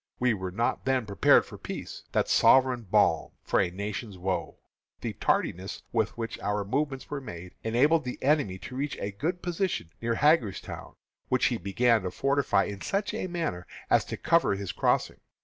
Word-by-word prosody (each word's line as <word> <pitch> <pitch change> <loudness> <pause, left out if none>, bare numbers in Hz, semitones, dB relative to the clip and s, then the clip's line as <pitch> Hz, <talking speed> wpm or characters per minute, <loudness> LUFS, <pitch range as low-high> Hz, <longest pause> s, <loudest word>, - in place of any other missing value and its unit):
We 125 -1 +2
were 95 -3 -4
not 115 +6 -1
then 130 -3 +1
prepared 100 -1 +4
for - - -11
peace, - - -7
that - - +1
sovereign 130 -4 +4
balm 95 -6 +3
for - - +1
a 90 - +1
nation's 100 +2 -5
woes. 90 -1 -2 0.5
The - - -3
tardiness 95 +3 -1
with 110 -1 0
which 115 -1 -4
our 105 0 -1
movements 135 +5 -2
were 145 -1 -3
made 90 -7 -9
enabled 145 +8 +3
the 125 - -5
enemy 140 -10 +1
to 125 - -7
reach 140 +2 -2
a 100 - -3
good 165 - -3
position 175 - -2
near 115 0 0
Hagerstown, 140 - +1 0.3
which - - +2
he - - +2
began 110 +5 +2
to 90 - -3
fortify 135 -4 +2
in 100 -1 -6
such 200 +1 -1
a - - -2
manner 165 - -3 0.2
as - - +5
to - - -5
cover 165 -11 +3
his 100 -2 -4
crossing. - - 0
115 Hz, 180 wpm, -28 LUFS, 100-140 Hz, 0.5 s, as